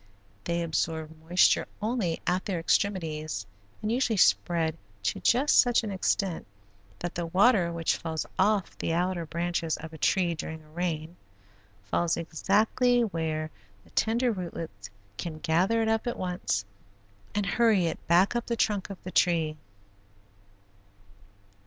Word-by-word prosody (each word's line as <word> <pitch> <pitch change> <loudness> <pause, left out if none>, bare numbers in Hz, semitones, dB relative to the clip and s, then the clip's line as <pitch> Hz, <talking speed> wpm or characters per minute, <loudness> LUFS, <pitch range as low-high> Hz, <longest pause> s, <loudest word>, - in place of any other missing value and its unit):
They 170 0 0
absorb 160 -1 -2
moisture 175 +3 +3
only 215 -7 -1
at 180 +1 0
their 185 -4 -1
extremities 155 - -1 0.4
and 215 - 0
usually 240 -3 +1
spread 165 -3 +3 0.3
to 100 - -1
just 265 +5 +4
such 245 -2 +4
an 215 - -3
extent 190 -1 -1 0.5
that 175 - -4
the 170 -1 -3
water 185 0 +4
which 170 -1 0
falls 160 -1 -3
off 200 -1 +2
the 165 - -1
outer 175 -1 -1
branches 170 -1 -1
of 160 0 -9
a 160 - -10
tree 180 -3 +2
during 160 0 -6
a 155 - -20
rain, 165 0 -3 0.7
falls 170 +11 0
exactly 215 +9 +2
where 160 -6 -2 0.3
the - - -22
tender 235 +2 +2
rootlets 165 - -6 0.3
can 165 -3 -5
gather 185 +9 +2
it - - 0
up 225 +2 0
at 240 - -2
once 180 - -2 0.7
and 205 -1 +1
hurry 215 -4 +3
it 165 - -4
back 180 +6 +4
up 240 - -1
the 235 - 0
trunk 205 -4 0
of 195 - -6
the 185 - -6
tree. 165 -4 +2
175 Hz, 145 wpm, -28 LUFS, 160-205 Hz, 0.7 s, just